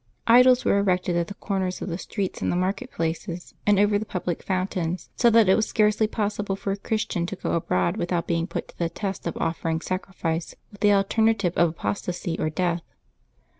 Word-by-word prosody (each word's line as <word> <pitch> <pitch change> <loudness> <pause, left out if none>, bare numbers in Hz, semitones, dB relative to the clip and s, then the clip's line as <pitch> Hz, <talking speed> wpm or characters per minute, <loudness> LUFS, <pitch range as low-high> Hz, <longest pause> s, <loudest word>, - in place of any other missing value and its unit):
Idols 250 +2 +6
were 200 - +4
erected 180 -3 +1
at 170 -1 0
the 200 - -8
corners 190 -3 -2
of - - -5
the 170 0 -3
streets, 195 -2 -4
in - - 0
the - - 0
market 195 +8 -1
places, 170 +1 -4
and 205 -1 +5
over 205 0 +3
the - - -3
public 180 -4 -3
fountains, 185 -2 -2
so 240 - +4
that 225 -2 +5
it 190 - +6
was 220 +1 +2
scarcely 215 0 +2
possible 205 -2 -2
for 195 0 -3
a - - 0
Christian 200 -5 -2
to 195 - -4
go - - -3
abroad 90 - 0
without 175 0 -1
being 170 0 0
put - - -4
to - - -17
the 170 -1 0
test 195 -1 -4
of 170 - -3
offering 165 0 -1
sacrifice, 175 -2 -3 0.2
with 205 - -16
the 210 - +5
alterna 220 +3 +3
tive 180 -4 -1
of 170 -1 +4
apostasy 175 0 -3
or 155 - 0
death. 175 +1 0
185 Hz, 205 wpm, -25 LUFS, 170-205 Hz, 0.2 s, Idols